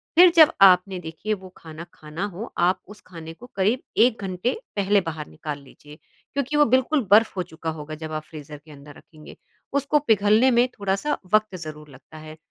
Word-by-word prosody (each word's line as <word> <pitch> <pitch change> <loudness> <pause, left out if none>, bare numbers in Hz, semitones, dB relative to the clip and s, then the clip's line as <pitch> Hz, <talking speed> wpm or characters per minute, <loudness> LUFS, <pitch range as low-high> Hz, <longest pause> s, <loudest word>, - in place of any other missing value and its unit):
फिर 355 +2 +8
जब 315 -3 +7
आपने 185 0 +5
देखिए 165 +6 -5
वो 190 -2 -8
खाना, 160 0 -10
खाना 155 +5 -6
हो 210 +7 -7
आप 180 +2 +2
उस 210 +1 -14
खाने 165 -2 -10
को 235 - -14
करीब 205 +6 +1 0.2
1 230 -1 +3
घंटे 185 +5 -2 0.2
पहले 200 0 +2
बाहर 160 -3 -6
निकाल 150 -2 -7
लीजिए, 145 +2 -16 0.4
क्योंकि 280 +1 -2
वो 295 - +5
बिल्कुल 260 +4 +2
बर्फ़ 220 +2 +5
हो 180 - 0
चुका 165 -1 -7
होगा 155 +1 -7
जब 155 0 -8
आप 155 0 -4
फ्रीज़र 150 -1 -10
के 155 +2 -18
अंदर 145 0 -14
रखेंगे 155 -2 -15 0.4
उसको 280 +1 +1
पिघलने 220 0 +3
में 240 +1 +3
थोड़ा-सा 200 +4 -2 0.2
वक़्त 215 -2 +2
ज़रूर 155 -3 -9
लगता 135 +3 -15
है। 155 0 -11
185 Hz, 190 wpm, -23 LUFS, 155-225 Hz, 0.4 s, फिर